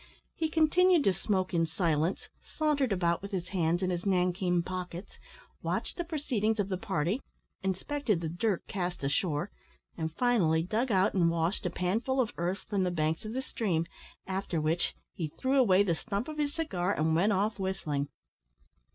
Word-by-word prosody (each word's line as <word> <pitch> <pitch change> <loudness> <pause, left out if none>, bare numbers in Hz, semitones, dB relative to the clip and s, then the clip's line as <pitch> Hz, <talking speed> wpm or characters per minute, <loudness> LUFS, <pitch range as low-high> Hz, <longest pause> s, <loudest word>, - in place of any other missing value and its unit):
He 320 -1 -1
continued 330 +2 +4
to 195 - +4
smoke 185 -1 -1
in 165 -1 +2
silence, 165 0 0 0.2
sauntered 295 -6 0
about 170 -3 +1
with 200 - -6
his 185 -3 -3
hands 175 -1 +1
in 185 - +1
his 175 -1 -2
nankeen 180 -2 +2
pockets, 180 +1 -6 0.4
watched - - -2
the 345 - -2
proceedings 250 -10 -1
of 200 -1 0
the 185 - -1
party, 195 - -1 0.4
inspected 210 - 0
the 165 - -3
dirt 175 +4 -1
cast 180 -5 -3
ashore, 150 +5 0 0.4
and, 160 -1 -2
finally, 170 -7 +2
dug 225 +7 0
out 190 0 +3
and 175 -3 +4
washed 170 +4 0
a - - 0
panful 220 +10 0
of 240 -4 +1
earth 180 +3 -2
from 200 -2 0
the 180 - +1
banks 160 +3 -1
of 215 - -4
the 260 +1 -2
stream, 180 -11 -1 0.4
after 190 -3 -2
which 155 +3 0 0.2
he 165 - -3
threw 260 - +1
away 200 -6 +5
the 180 -4 +1
stump 200 +6 -3
of 310 -1 -6
his 290 -1 +1
cigar, 195 - -1
and 160 +1 +1
went 195 +6 +3
off 205 +2 +1
whistling. 155 -7 -1
190 Hz, 175 wpm, -30 LUFS, 170-225 Hz, 0.4 s, away